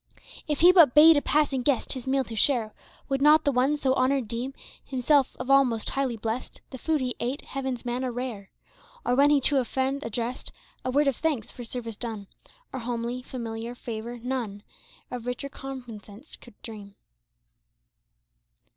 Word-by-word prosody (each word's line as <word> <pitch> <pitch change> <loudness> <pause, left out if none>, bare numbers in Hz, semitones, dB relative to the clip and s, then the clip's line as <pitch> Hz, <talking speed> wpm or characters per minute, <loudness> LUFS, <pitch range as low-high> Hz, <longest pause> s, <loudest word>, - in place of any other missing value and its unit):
If 295 0 -1
he 350 +2 +9
but 330 -9 +6
bade 315 +2 +9
a 290 - +3
passing 290 -4 +1
guest 265 0 +1
His 260 -2 -6
meal 270 0 +2
to 230 - -8
share. 225 -2 +2 0.3
Would 270 0 -1
not 300 +2 +6
the 285 - +2
one 270 +3 +2
so 265 -3 +1
honored 260 -1 +1
deem 245 +5 -4 0.3
Himself 270 +1 +2
of 270 - -3
all 275 0 +7
most 230 -4 -2
highly 265 -4 -1
blessed. 225 +3 -4
The 260 - -8
food 315 0 0
he 250 -2 -2
ate 250 +4 -2
heaven's 265 -3 -4
manna 250 +1 -2
rare? 235 -5 -5 0.6
Or 245 - +2
when 280 +3 +5
he 295 -1 +5
to 275 +1 +3
a - - +1
friend 265 +3 -2
addressed 235 +2 -4 0.3
A - - -2
word 285 +3 +3
of 275 - +1
thanks 295 -9 -1
for 245 - -9
service 230 -2 -6
done. 220 -4 -5 0.5
Or 260 - -3
homely, 240 +1 -3
familiar 235 -2 -6
favor, 235 0 -6
none 235 -5 -4 0.5
Of 245 -1 -6
richer 260 +3 -4
recompense 240 -2 -9
could 240 -4 -17
dream. 205 -3 -10
255 Hz, 175 wpm, -27 LUFS, 235-275 Hz, 0.6 s, he